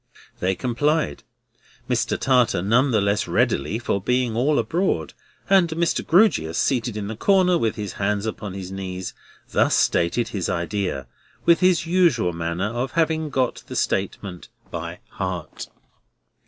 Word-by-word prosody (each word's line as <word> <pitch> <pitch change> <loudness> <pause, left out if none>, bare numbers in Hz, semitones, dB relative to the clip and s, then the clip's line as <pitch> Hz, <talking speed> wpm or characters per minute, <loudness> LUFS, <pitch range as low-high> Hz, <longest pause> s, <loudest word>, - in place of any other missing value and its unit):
They 95 +1 0
complied; 130 - 0 0.7
Mr. - - 0
Tartar 125 -9 +2
none 120 +7 +3
the 110 -4 +2
less 100 +1 +1
readily, 95 +10 +1
for 105 -4 -1
being 125 +1 0
all 140 +5 +2
abroad; 120 - 0 0.3
and 190 -3 +4
Mr. 165 +1 0
Grewgious, 165 - +3
seated 120 -4 0
in 105 - -3
the 110 +2 -5
centre, 185 -2 +4
with 115 -9 0
his 105 -3 -5
hands 100 +1 -1
upon 105 -3 -5
his 95 -1 -6
knees, 95 -1 -5 0.4
thus - - +2
stated 85 +8 +1
his 95 -4 -3
idea, 85 -5 -2 0.4
with 170 0 +5
his 185 -2 +3
usual 165 - +2
manner 85 +3 -2
of 125 +2 -3
having 160 -1 +1
got 130 -3 -1
the - - -7
statement 90 -3 -2 0.2
by - - -6
heart. 90 -4 -5
115 Hz, 145 wpm, -23 LUFS, 95-155 Hz, 0.7 s, with